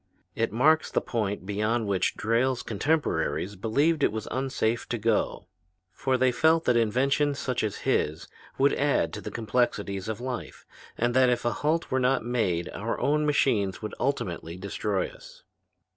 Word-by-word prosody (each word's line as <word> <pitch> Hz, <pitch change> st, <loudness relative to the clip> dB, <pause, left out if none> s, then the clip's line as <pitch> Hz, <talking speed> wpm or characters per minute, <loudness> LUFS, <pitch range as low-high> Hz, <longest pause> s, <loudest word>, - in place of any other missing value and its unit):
It 115 Hz, -, -1 dB
marks 155 Hz, +7 st, +3 dB
the -, -, +1 dB
point 105 Hz, -5 st, -3 dB
beyond 105 Hz, +3 st, 0 dB
which 95 Hz, -3 st, 0 dB
Drayle's 120 Hz, +3 st, +1 dB
contemporaries 115 Hz, -, -1 dB
believed 140 Hz, -, +1 dB
it -, -, +3 dB
was 110 Hz, 0 st, -5 dB
unsafe 130 Hz, -3 st, -1 dB
to 120 Hz, -, -1 dB
go: 110 Hz, -2 st, 0 dB, 0.5 s
for 130 Hz, -1 st, 0 dB
they 130 Hz, 0 st, +3 dB
felt 160 Hz, +6 st, +3 dB
that 125 Hz, -, +3 dB
inventions 135 Hz, +5 st, +2 dB
such 125 Hz, -3 st, -2 dB
as 105 Hz, -2 st, -3 dB
his 75 Hz, +2 st, 0 dB, 0.3 s
would -, -, +4 dB
add -, -, +1 dB
to -, -, -5 dB
the -, -, -6 dB
complexities 105 Hz, -4 st, -1 dB
of 110 Hz, 0 st, -3 dB
life, 125 Hz, 0 st, -6 dB, 0.3 s
and 120 Hz, +1 st, +1 dB
that 130 Hz, 0 st, +5 dB
if 120 Hz, -1 st, 0 dB
a 120 Hz, -, +1 dB
halt 160 Hz, +3 st, -1 dB
were 130 Hz, -, +2 dB
not 130 Hz, -2 st, +1 dB
made 95 Hz, -8 st, 0 dB
our 115 Hz, +3 st, -3 dB
own 150 Hz, +1 st, +1 dB
machines 110 Hz, -10 st, +1 dB
would 105 Hz, -, -4 dB
ultimately 90 Hz, -10 st, -2 dB
destroy 100 Hz, 0 st, -2 dB
us. -, -, -15 dB
120 Hz, 165 wpm, -27 LUFS, 105-130 Hz, 0.5 s, that